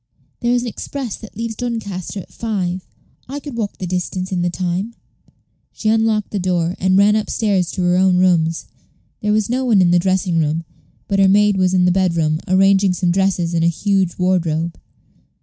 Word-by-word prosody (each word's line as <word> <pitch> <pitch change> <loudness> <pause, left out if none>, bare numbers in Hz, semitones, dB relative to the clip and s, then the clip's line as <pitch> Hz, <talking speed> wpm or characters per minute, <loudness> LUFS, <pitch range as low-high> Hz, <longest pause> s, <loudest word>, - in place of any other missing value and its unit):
"There 240 0 0
is 245 - 0
an - - -4
express 245 +1 -5
that 220 -2 -13
leaves 230 0 -3
Doncaster 210 -6 -4
at - - -16
five. 185 -5 -3 0.4
I 285 +2 -4
could 285 -3 -8
walk 215 -3 -3
the 185 - -5
distance 185 +1 -3
in 180 -2 -1
the 175 - +1
time." 185 +6 -3 0.8
She 215 - -2
unlocked 220 -1 +1
the 205 - -2
door, 180 -1 0
and 185 0 +2
ran 205 +1 +5
up 215 -1 -1
stairs 195 -6 0
to 185 - -2
her 175 0 +2
own 185 -1 +3
rooms. 170 -3 +2 0.5
There 210 - -1
was 215 -1 +1
no 255 +2 -1
one 230 -6 +3
in 175 -2 +4
the 175 - +4
dressing 185 -2 +1
room, 155 +1 0 0.4
but 200 -1 0
her 195 - +5
maid 205 +1 +4
was 185 -1 +2
in 180 -1 +3
the 180 - +4
bedroom, 170 -4 +1
arranging 195 0 +4
some 180 0 0
dresses 180 -2 0
in 165 - +1
a 165 - +3
huge 190 +1 0
wardrobe. 170 -3 0
190 Hz, 200 wpm, -19 LUFS, 175-210 Hz, 0.8 s, ran